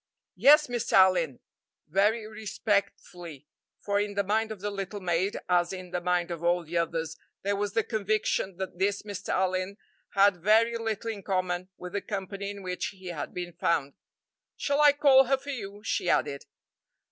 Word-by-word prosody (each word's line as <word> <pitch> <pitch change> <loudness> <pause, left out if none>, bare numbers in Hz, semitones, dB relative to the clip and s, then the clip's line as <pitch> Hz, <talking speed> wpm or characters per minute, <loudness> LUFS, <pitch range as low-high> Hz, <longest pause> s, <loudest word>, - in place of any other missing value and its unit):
"Yes, 300 +2 +7
Mr. 245 -2 -3
Allyn," 180 -8 +4 0.5
very 210 +6 +2
respectfully, 200 - -3 0.3
for 200 0 -1
in 205 0 -2
the 200 - +1
mind 220 +3 0
of 215 - -6
the 205 +2 -3
little 200 +1 -5
maid, 185 +1 0
as 175 -1 +2
in 185 -2 -7
the 180 0 -2
mind 175 0 0
of 170 -1 -5
all 175 0 +2
the 165 +2 -8
others, 165 -1 -1 0.3
there 200 +1 0
was 205 0 -2
the 225 - +2
conviction 210 -4 -1
that 185 -2 -6
this 200 +1 0
Mr. 205 -2 -7
Allyn 185 +1 0 0.4
had 200 -1 +5
very 220 +6 +3
little 225 0 -2
in 205 -2 -7
common 185 -1 -2
with 180 0 -8
the 200 - -1
company 200 0 -5
in 200 -1 -8
which 180 -1 -3
he 190 -2 -9
had 165 -4 -5
been 175 -1 -6
found. 145 -6 0 0.6
"Shall 285 +1 +1
I 295 -1 +8
call 275 -2 +6
her 270 +2 +2
for 285 +2 -7
you?" 205 -5 -7
she 180 - -1
added. 140 -1 0
195 Hz, 180 wpm, -28 LUFS, 180-215 Hz, 0.6 s, I